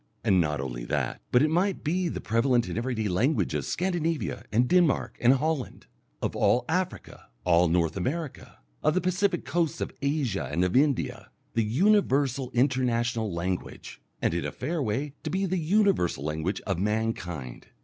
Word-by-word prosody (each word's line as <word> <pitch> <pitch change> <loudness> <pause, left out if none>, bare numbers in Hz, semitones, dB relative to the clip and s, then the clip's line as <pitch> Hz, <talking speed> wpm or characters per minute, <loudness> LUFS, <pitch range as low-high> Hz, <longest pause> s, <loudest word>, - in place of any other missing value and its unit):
And 95 -2 +4
not 75 -3 -1
only - - -4
that, - - -2
but 125 +3 +5
it 155 - +2
might 185 +3 +1
be 175 +4 0
the - - -3
prevalent 120 +2 +1
and - - -4
everyday 115 -2 -1
language 115 - +1
of - - -1
Scandinavia 165 - -1
and 120 +3 +3
Denmark 175 -4 +2
and 125 +2 +6
Holland, 150 0 -2 0.4
of - - -1
all 125 - +3
Africa, 180 +3 -3 0.2
all 90 0 +4
North 85 -1 +1
America, 140 - -4 0.2
of 155 - +2
the - - +4
Pacific 185 +1 0
coasts 170 -3 0
of - - -3
Asia 140 -8 -1
and 85 +4 +1
of 90 - -1
India, 130 -6 +1 0.2
the 115 - +2
universal 135 - +2
international 120 -3 +1
language, 90 +2 -4 0.2
and - - +2
in - - -1
a - - -3
fair 165 0 -3
way 135 +5 -2
to - - -4
be 190 +1 0
the 185 0 -1
universal 175 - +2
language 80 +5 -2
of 95 -4 -2
mankind. 100 - -3
125 Hz, 170 wpm, -27 LUFS, 100-160 Hz, 0.4 s, and